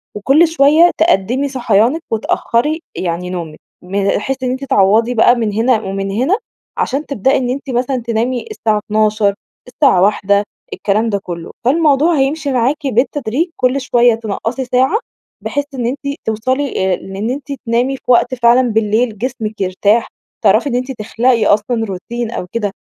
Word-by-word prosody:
وكل 275 +11 +4
شوية 320 +2 +4
تقدمي 260 - +1
صحيانك 245 +3 +1
وتأخري 235 +7 0
يعني 180 0 -3
نومِك، 170 -4 -6 0.2
م 195 +2 -2
بحيث 265 +5 -3
إن 250 - 0
أنتِ 260 +2 -4
تعوضي 220 +2 +3
بقى 240 +1 +5
مِن 225 -3 -2
هنا 225 +1 +2
ومِن 195 0 -4
هنا، 265 - +1 0.4
عشان 285 +3 -1
تبدئي 265 0 +1
إن 250 -1 -2
أنتِ 275 +2 -4
مثلًا 255 +1 -1
تنامي 235 +2 -1
الساعة 220 - 0
00:00، 215 -1 +1 0.3
الساعة 250 -8 +3
1:00، 200 0 +2 0.3
الكلام 215 +3 0
ده 200 - 0
كله. 170 -1 -7
فالموضوع 305 +3 +3
هيمشي 280 +2 0
معاكِ 270 +4 0
بالتدريج 260 - 0
كل 255 +2 +1
شوية 240 -2 +3
تنقَّصي 225 +3 -4
ساعة، 260 - +2 0.4
بحيث 285 0 -2
إن 245 -3 -3
أنتِ 280 +3 -3
توصلي 220 -3 -1
آآ، - - +2
لإن 195 +5 -5
أنتِ 270 +1 -5 0.2
تنامي 245 +4 0
في - - -25
وقت 250 +1 +3
فعلًا 240 +1 +4
بالليل 220 +1 0
جسمك 220 -3 -4
يرتاح، 200 +4 +1 0.4
تعرفي 290 - +3
إن 245 - -2
أنتِ 255 +2 -2
تخلقي 230 0 0
أصلًا 225 +2 +1
روتين 225 +5 -5
أو 180 - -5
كده. 215 -3 -2
240 Hz, 160 wpm, -16 LUFS, 210-270 Hz, 0.4 s, بقى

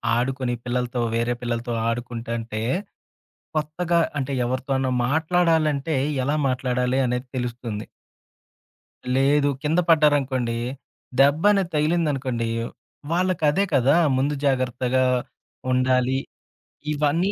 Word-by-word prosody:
ఆడుకొని 125 0 -1
పిల్లలతో, 125 0 -1
వేరే 120 +1 +1
పిల్లలతో 120 0 -2 0.2
ఆడుకుంటంటే, 115 -2 -4 1.0
కొత్తగా 170 +3 0 0.2
అంటే, 135 +1 -3
ఎవరితోనా 130 +1 -1 0.2
మాట్లాడాలంటే 160 -1 +1 0.3
ఎలా 145 +2 +1
మాట్లాడాలే 125 0 0
అనేది 125 +1 -2
తెలుస్తుంది. 120 -3 -4 1.3
లేదు. 140 +2 +3
కింద 160 +4 +2
పడ్డారనుకోండి. 140 -6 +3 0.6
దెబ్బనేది 175 +7 +4
తగిలిందనుకోండి. 145 -7 0 0.6
వాళ్ళకదే 180 0 +2
కదా! 135 +3 +4 0.2
ముందు 140 +3 +1
జాగ్రత్తగా 130 -1 +1 0.7
ఉండాలి. 130 +1 +2 0.7
ఇవన్నీ 155 +7 +1
135 Hz, 85 wpm, -23 LUFS, 125-150 Hz, 1.3 s, దెబ్బనేది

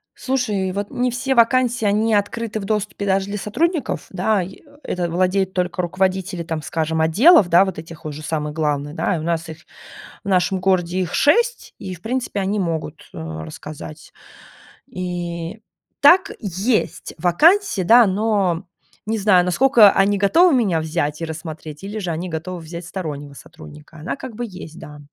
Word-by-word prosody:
Слушай, 215 -8 -1
вот 205 +1 -4
не 250 0 0
все 265 +2 -1
вакансии 245 0 +3
они 215 +2 +2
открыты 215 +2 -1
в - - -6
доступе, 205 -1 -2
даже 195 0 +1
для 205 +1 -4
сотрудников, 320 - -1
да. 200 0 +1
Э, 175 - -5 0.3
это 175 -1 -2
владеют 185 +2 +1
только 180 -1 -1
руководители, 185 0 -1
там 160 -1 -4
скажем, 160 +1 -2
отделов, 200 - +6
да, 175 +3 +6
вот 190 -4 -5
этих 165 -1 -10
уже 155 0 -6
самых 150 -1 -3
главных, 145 -2 -1
да. 180 - 0
У - - -5
нас 170 0 -2
их, 160 - -8 0.7
в - - -10
нашем 185 0 +2
городе 185 -1 +1
их 180 -2 -2
6, 475 +10 +2
и, 185 -1 -6
в 170 - -18
принципе, 245 -1 -2
они 200 +2 -1
могут, 160 -3 -4
э, - - -10
рассказать. 80 - -8 0.8
И 175 +2 -5 0.4
так 345 +6 +6
есть 205 +4 -1
вакансии, 255 - +3
да, 230 +5 +7
но 195 -3 0 0.4
не 220 +1 -1
знаю, 195 -3 +4
насколько 220 +3 +6
они 200 +1 +2
готовы 325 - +5
меня 200 -10 +2
взять 155 -1 -2
и - - -1
рассмотреть, 160 -1 -8
или 205 +2 -5
же 180 -4 -3
они 175 +3 -4
готовы 170 +3 -5
взять 170 +1 -8
стороннего 150 -6 -6
сотрудника, 75 - -14
она 155 - -4
как 245 -5 -8
бы 240 - -4
есть, 180 -4 -10
да. 150 0 -11
185 Hz, 165 wpm, -20 LUFS, 165-215 Hz, 0.8 s, да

